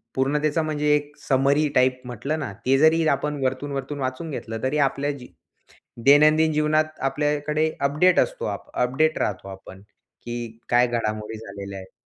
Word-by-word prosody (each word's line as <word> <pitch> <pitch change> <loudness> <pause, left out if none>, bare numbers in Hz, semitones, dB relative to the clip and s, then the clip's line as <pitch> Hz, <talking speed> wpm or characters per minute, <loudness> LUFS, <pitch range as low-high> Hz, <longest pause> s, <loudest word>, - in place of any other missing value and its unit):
पूर्ण 135 +3 +1
त्याचा 155 +2 +1
म्हणजे 150 -1 +1
एक 145 0 -4
समरी 140 +3 +3
टाइप 130 0 +3
म्हटलं 140 +6 -3
ना 125 -8 -4
ते 135 +1 +4
जरी 160 +2 +4
आपण 145 0 -1
वरतून-वरतून 135 +2 -3
वाचून 130 +5 -3
घेतलं 115 -3 -6
तरी 140 +3 0
आपल्या 145 +1 -3
जी 125 - -11 0.8
दैनंदिन 155 +2 +6
जीवनात 155 +1 0
आपल्याकडे 150 +3 0
अपडेट 150 +6 +3
असतो - - -2
आप - - -5
अपडेट 135 +6 +1
राहतो 100 -1 -3
आपण, 95 0 -11 0.4
की 120 -1 -6
काय 120 0 +4
घडामोडी 110 -2 -3
झालेल्या 100 -2 -8
आहेत. 95 0 -12
140 Hz, 155 wpm, -23 LUFS, 125-150 Hz, 0.8 s, दैनंदिन